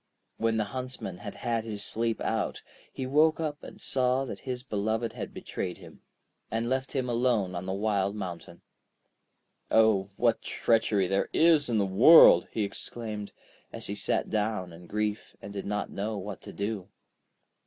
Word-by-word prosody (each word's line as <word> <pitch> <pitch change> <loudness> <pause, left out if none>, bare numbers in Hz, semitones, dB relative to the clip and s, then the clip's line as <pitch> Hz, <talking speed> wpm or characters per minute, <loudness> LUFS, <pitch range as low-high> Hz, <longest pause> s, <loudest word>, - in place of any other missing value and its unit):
When 115 0 +1
the 110 - +2
Huntsman 125 -8 -5
had 100 -1 -7
had 115 +1 -1
his 105 -2 -2
sleep 115 0 0
out, - - -2 0.3
he 130 - -5
woke 155 +4 +3
up 150 -2 -3
and - - -11
saw 130 0 +1
that 125 - -6
his 125 -1 -3
beloved 110 0 -1
had - - -6
betrayed 90 -2 -5
him, 85 -5 -14 0.5
and 115 +1 -1
left 130 +1 -1
him 130 -3 -1
alone 115 -6 +1
on 90 +1 -5
the 95 - -1
wild 100 -1 0
mountain. 85 -3 -7 1.1
'Oh, 110 -3 +4
what 115 -2 +2
treachery 110 -4 +1
there 95 +2 0
is 160 -4 +4
in 115 - +1
the 100 - +2
world!' 95 - +8
he 110 - -1
exclaimed, 105 +1 -6 0.4
as - - -5
he - - -2
sat - - 0
down 105 -5 -1
in 85 +1 -13
grief, 105 +1 -3
and 100 - -9
did 100 -1 -5
not 105 0 -2
know 105 +2 -3
what 100 0 -6
to - - -10
do. 100 -2 -4
110 Hz, 170 wpm, -28 LUFS, 100-120 Hz, 1.1 s, world